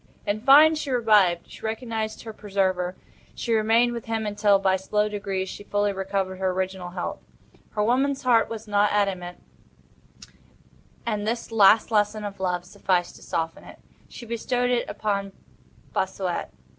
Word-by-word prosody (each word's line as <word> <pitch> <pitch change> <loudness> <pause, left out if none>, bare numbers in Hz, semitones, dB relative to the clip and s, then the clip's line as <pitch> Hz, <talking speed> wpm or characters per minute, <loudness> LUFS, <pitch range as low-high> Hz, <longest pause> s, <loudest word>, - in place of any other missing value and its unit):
In 205 +1 -1
fine, 290 +5 +7
she 310 -2 -4
revived. 210 -8 +3
She - - -13
recognized 220 -1 -4
her 225 -1 -7
preserver. 190 -3 -1 0.4
She 235 - -2
remained 225 +2 +3
with 235 -2 -6
him 225 -1 -2
until, 205 -1 +3
by 190 -1 +2
slow 210 +3 0
degrees, 200 -2 -3
she 205 - -8
fully 205 0 0
recovered 190 -1 -2
her 190 0 0
original 185 -1 -3
health. 175 0 -5 0.6
Her 210 - +1
woman's 265 +5 +1
heart 240 -3 +3
was 225 -1 -7
not 205 0 +2
adamant, 185 -4 -1 1.6
and 210 -2 -2
this 230 +1 -3
last 220 +1 +5
lesson 210 0 +1
of 200 -1 -7
love 180 -1 -1
sufficed 180 -2 -1
to - - -17
soften 165 0 -3
it. - - -13 0.3
She 240 - -10
bestowed 245 +2 -1
it 245 -1 0
upon 200 -2 -2 0.6
Bossuet. - - -2
205 Hz, 155 wpm, -25 LUFS, 190-225 Hz, 1.6 s, fine